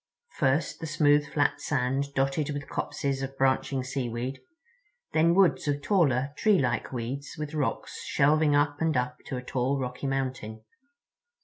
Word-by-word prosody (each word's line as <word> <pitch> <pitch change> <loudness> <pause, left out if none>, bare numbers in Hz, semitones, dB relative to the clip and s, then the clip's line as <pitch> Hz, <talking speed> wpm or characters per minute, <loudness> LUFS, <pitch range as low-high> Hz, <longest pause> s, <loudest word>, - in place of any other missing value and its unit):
First, 135 +2 +1
the 160 - -5
smooth 145 -1 +3
flat 145 - 0
sand 140 0 -1
dotted 135 +2 0
with 145 -1 -4
copses 135 -1 -2
of 135 0 -5
branching 135 0 +1
seaweed—then 170 - -3
woods 190 -4 +3
of 145 0 -1
taller 140 -9 +2
treelike 140 - +2
weeds 130 +3 -5
with 150 0 -5
rocks 150 -3 -3
shelving 150 +1 +3
up 145 +1 +1
and 160 -4 +2
up 125 0 -1
to 130 - -3
a 125 - -6
tall, 130 +2 0
rocky 125 +1 -4
mountain. 130 -5 -3
140 Hz, 140 wpm, -28 LUFS, 130-155 Hz, -, smooth